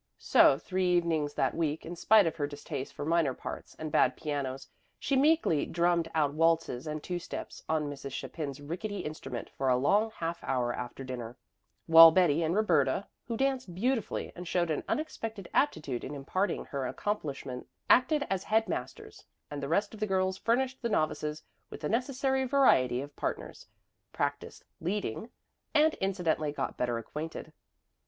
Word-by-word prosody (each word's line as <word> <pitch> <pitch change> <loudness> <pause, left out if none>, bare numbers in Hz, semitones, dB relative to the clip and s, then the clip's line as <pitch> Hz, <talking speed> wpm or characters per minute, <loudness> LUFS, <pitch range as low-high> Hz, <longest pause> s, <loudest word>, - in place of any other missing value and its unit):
So 135 - +5
three 185 +2 0
evenings 160 -4 0
that - - +1
week, 160 -2 -2
in 170 +2 -6
spite 210 +3 +5
of 165 - -1
her 145 -2 -1
distaste 145 -1 -6
for - - -6
minor 160 -5 +2
parts - - -8
and 155 -1 -5
bad 130 -2 +3
pianos, 140 -4 -4 0.3
she 275 - -1
meekly 275 - +3
drummed 170 -1 +1
out 145 -3 +2
waltzes 165 -4 +1
and 155 0 -4
two 180 -1 -3
steps 170 - -7
on 155 -2 +1
Mrs. 140 -1 -6
Chapin's 140 0 -5
rickety 185 +8 -4
instrument 135 -5 -6
for 135 -1 -1
a 125 - +4
long 205 - +3
half 170 -5 -5
hour 120 -2 0
after 125 +2 -6
dinner, 125 -2 -6 0.5
while 165 0 +10
Betty 165 -2 +3
and 165 +2 0
Roberta 170 -5 +2 0.2
who 230 -2 -3
danced 260 -8 -1
beautifully 230 +3 -1
and 180 0 -8
showed 175 -1 +1
an 150 - -1
unexpected 225 - -3
aptitude 150 - 0
in 145 - -5
imparting 185 +8 -1
her 135 -2 -3
accomplishment 140 -9 -4 0.2
acted 285 +4 +4
as 195 -1 -2
head 220 0 +2
masters, 130 -7 -6 0.2
and 145 -1 -4
the 140 - -3
rest 200 +6 +1
of 220 - -10
the 215 - -1
girls 190 -1 +1
furnished 255 +5 0
the 235 - -1
novices 155 -4 -1 0.3
with - - -9
the 150 - -2
necessary 265 +3 0
variety 245 - +3
of 145 +1 -9
partners, - - -5 0.4
practiced 145 0 -3 0.2
"leading," 195 - -3 0.5
and 310 +1 +5
incidentally 175 -6 0
got 140 -2 -3
better 120 -1 -1
acquainted. 155 +6 -6
165 Hz, 165 wpm, -30 LUFS, 145-205 Hz, 0.5 s, while